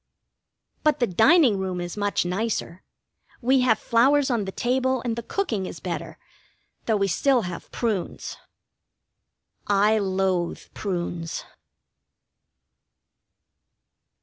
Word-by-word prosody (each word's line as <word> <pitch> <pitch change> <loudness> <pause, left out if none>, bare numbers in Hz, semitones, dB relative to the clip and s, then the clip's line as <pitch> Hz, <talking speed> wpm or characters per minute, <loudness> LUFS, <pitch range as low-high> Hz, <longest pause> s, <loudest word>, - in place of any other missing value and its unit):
But 305 -1 +2
the 245 - +3
dining 230 - +4
room 185 -1 -2
is 175 0 -5
much 205 -3 0
nicer. 185 -2 -2 0.6
We 260 +2 +3
have 245 -4 +3
flowers 265 +5 +3
on 225 -4 0
the 190 - -4
table, 260 +3 0
and 230 -2 -1
the 235 - -4
cooking 230 - -2
is - - -8
better, - - -5 0.7
though 220 -2 +3
we 195 -1 +1
still 250 +7 +2
have 175 -1 -7
prunes. 215 -7 -3 1.3
I 205 +2 +3
loathe 190 -3 -1
prunes. 175 -4 -3
215 Hz, 110 wpm, -25 LUFS, 185-250 Hz, 1.3 s, dining